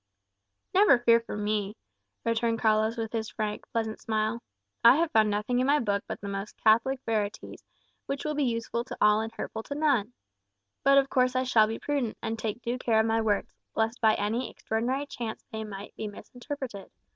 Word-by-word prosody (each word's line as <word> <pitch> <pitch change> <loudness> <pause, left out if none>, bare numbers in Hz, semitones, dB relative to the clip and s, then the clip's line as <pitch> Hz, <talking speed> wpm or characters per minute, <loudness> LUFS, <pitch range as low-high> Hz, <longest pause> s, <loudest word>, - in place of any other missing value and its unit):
"Never 390 -8 +6
fear 235 -1 +5
for 230 -2 -7
me," 210 0 -1 0.5
returned 230 0 +1
Carlos, 220 +1 +2
with 225 0 -4
his 220 -1 -2
frank, 210 -1 -4
pleasant 220 -1 -2
smile. 220 +1 -1 0.4
"I 235 +2 +9
have 325 +1 +1
found 215 -1 +4
nothing 210 +4 0
in 255 - +2
my 290 +1 +5
Book 200 -6 0
but - - -5
the 200 - -6
most 200 +1 -5
Catholic 230 +5 +3
verities, 210 -2 -3 0.4
which 275 +1 -3
will 305 - 0
be 295 -1 0
useful 235 -1 -1
to - - -7
all 210 +1 +5
and 225 0 -4
hurtful 220 0 -5
to 285 - -6
none. 270 -7 +1 0.7
But 275 0 +6
of 275 -1 +3
course 255 0 +2
I 255 - +2
shall 225 -4 +4
be 225 +1 -3
prudent, 275 -7 -2
and 225 0 -3
take 220 +2 -4
due 240 +2 -2
care 225 -3 +2
of 220 - +3
my 225 0 +2
words, 210 -2 0 0.2
lest 225 +2 0
by 220 -1 +5
any 225 +4 -1
extraordinary 250 +6 -2
chance 235 -5 -6
they 220 0 -4
might 205 -1 -8
be 215 - -4
misinterpreted. 245 0 -7
225 Hz, 195 wpm, -28 LUFS, 215-250 Hz, 0.7 s, I